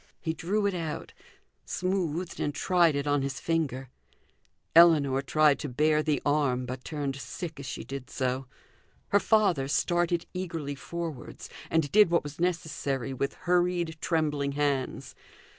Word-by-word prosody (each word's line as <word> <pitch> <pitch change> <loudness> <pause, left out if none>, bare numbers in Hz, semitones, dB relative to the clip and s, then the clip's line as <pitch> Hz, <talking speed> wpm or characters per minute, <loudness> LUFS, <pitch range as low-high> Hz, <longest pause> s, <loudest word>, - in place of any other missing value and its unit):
He 160 - -2
drew 200 +6 -1
it 200 - +1
out, 165 -4 -4 0.5
smoothed 180 -2 -2
and 145 - -1
tried 175 -5 +3
it 140 0 -1
on 145 -1 +2
his 135 -2 -3
finger. 135 -6 -2 0.8
Ellinor 150 -6 +6
tried 150 +1 +3
to 150 - -4
bare 150 +4 +2
the 150 -3 0
arm, 140 -4 +1
but 130 +1 -6
turned 145 -3 -3
sick 160 +2 -6
as 140 - -7
she - - -5
did 135 -1 -7
so. 130 -1 -2 0.6
Her 205 - +4
father 195 -12 +2
started 175 +3 +1
eagerly 165 -6 -4
forwards, 160 0 -7 0.2
and 160 -3 +1
did 210 -3 +6
what 170 0 +2
was 145 +1 -8
necessary 155 -7 -1
with 140 +2 -2
hurried 175 -2 +1
trembling 150 -4 0
hands. 140 -2 -1
150 Hz, 145 wpm, -28 LUFS, 140-170 Hz, 0.8 s, Ellinor